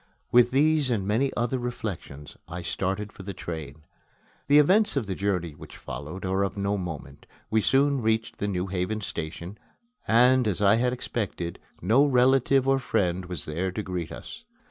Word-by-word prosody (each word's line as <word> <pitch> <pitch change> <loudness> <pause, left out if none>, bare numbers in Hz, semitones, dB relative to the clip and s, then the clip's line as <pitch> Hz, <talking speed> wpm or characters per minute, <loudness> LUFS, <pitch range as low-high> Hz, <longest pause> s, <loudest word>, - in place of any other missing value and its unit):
With 120 0 +6
these 145 +1 +3
and 110 -6 0
many 120 +7 +1
other 120 +2 0
reflections 100 - -6
I 90 +1 -6
started 95 +4 -2
for - - -11
the 95 0 -7
train. 80 -4 -7 0.6
The 145 +1 +6
events 195 +8 +4
of 130 - 0
the 95 - -3
journey 90 -4 -1
which 75 - -12
followed 85 +7 -7
are 95 +1 0
of 100 0 -1
no 100 +1 0
moment. 80 -7 -7 0.2
We 110 0 +3
soon 135 +4 +3
reached 110 0 0
the 100 - -1
New 90 -2 -1
Haven 95 +3 -2
station; 85 +2 -6 0.5
and, 125 +1 +5
as 95 -5 0
I 105 +1 +5
had 125 +1 +2
expected, 100 -8 -4 0.2
no 115 +9 +5
relative 135 0 +3
or 135 0 +3
friend 90 -7 0
was 85 -4 -4
there 85 +5 -2
to 105 - -3
greet 90 -3 -4
us. - - -9
100 Hz, 175 wpm, -26 LUFS, 90-125 Hz, 0.6 s, With